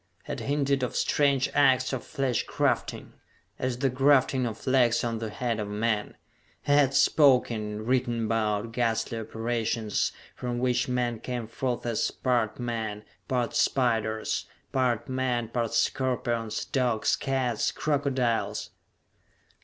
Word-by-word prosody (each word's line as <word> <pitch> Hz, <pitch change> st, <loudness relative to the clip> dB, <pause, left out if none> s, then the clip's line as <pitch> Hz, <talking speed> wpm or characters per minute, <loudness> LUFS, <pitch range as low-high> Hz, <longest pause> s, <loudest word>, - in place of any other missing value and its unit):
Had 145 Hz, -, -5 dB
hinted 140 Hz, +2 st, 0 dB
of 125 Hz, -, -2 dB
strange 140 Hz, -2 st, +2 dB
acts 135 Hz, -2 st, +3 dB
of 130 Hz, -, -3 dB
flesh 135 Hz, -5 st, -1 dB
grafting -, -, -1 dB, 0.5 s
as 130 Hz, -1 st, -1 dB
the 135 Hz, +1 st, +1 dB
grafting 130 Hz, -1 st, +3 dB
of 110 Hz, -1 st, -7 dB
legs 125 Hz, -3 st, +3 dB
on 115 Hz, -1 st, -2 dB
the 110 Hz, -1 st, -4 dB
head 115 Hz, 0 st, -2 dB
of 105 Hz, -, -3 dB
man. 105 Hz, 0 st, -1 dB, 0.5 s
He -, -, -1 dB
had 140 Hz, -2 st, +4 dB
spoken, 130 Hz, -6 st, +4 dB
and 105 Hz, +1 st, -5 dB
written 120 Hz, -3 st, +1 dB
about, 110 Hz, 0 st, 0 dB
ghastly 115 Hz, -1 st, -1 dB
operations, 115 Hz, -1 st, -1 dB, 0.2 s
from 120 Hz, -1 st, -3 dB
which 125 Hz, 0 st, +1 dB
men 120 Hz, -2 st, -1 dB
came 125 Hz, -1 st, -4 dB
forth 120 Hz, +2 st, -3 dB
as 115 Hz, -2 st, 0 dB
part 125 Hz, -4 st, 0 dB
men, 110 Hz, -3 st, -3 dB, 0.2 s
part 125 Hz, -2 st, -1 dB
spiders; 110 Hz, -4 st, +1 dB, 0.2 s
part 125 Hz, -4 st, 0 dB
men, 130 Hz, -3 st, -1 dB
part 115 Hz, -1 st, -2 dB
scorpions, 120 Hz, -4 st, 0 dB
dogs, 125 Hz, -5 st, +1 dB
cats, 130 Hz, -4 st, 0 dB
crocodiles.... 135 Hz, -6 st, -1 dB
120 Hz, 130 wpm, -27 LUFS, 115-130 Hz, 0.5 s, had